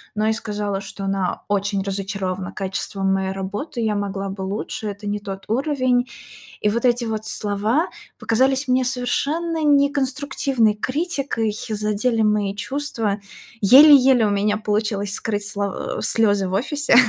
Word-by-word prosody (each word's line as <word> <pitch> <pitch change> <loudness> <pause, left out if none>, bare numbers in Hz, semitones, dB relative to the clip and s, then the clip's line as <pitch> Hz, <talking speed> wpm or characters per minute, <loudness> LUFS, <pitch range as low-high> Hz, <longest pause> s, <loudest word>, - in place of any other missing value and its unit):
но 215 +1 +1
и 220 - +3
сказала, 210 -3 -3
что 200 0 -8
она 195 -2 -2
очень 200 -1 0
разочарована 190 -1 -3
качеством 195 0 -2
моей 190 0 -1
работы, 200 +8 -5
я 220 -2 +1
могла 200 -1 -3
бы 195 0 -6
лучше, 205 +2 -4
это 205 +1 -6
не 205 0 -1
тот 195 -1 -7
уровень. 255 0 +1 0.5
И - - +1
вот 230 +2 -1
эти 240 0 +3
вот 220 -1 -3
слова 220 - 0 0.3
показались 265 +4 +1
мне 255 +1 +3
совершенно 300 +6 -1
неконструктивной 280 -4 +2
критикой, 265 - -1 0.2
задели 215 +2 0
мои 210 -2 +1
чувства. 225 -5 -2 0.4
Еле-еле 265 +1 +7
у - - +1
меня 205 +1 +1
получилось 210 -1 -1
скрыть 205 -1 -2
слов 200 -1 -2
э, - - -4
слёзы 205 -4 +3
в - - -5
офисе, 285 +7 +1
215 Hz, 145 wpm, -21 LUFS, 200-255 Hz, 0.5 s, Еле-еле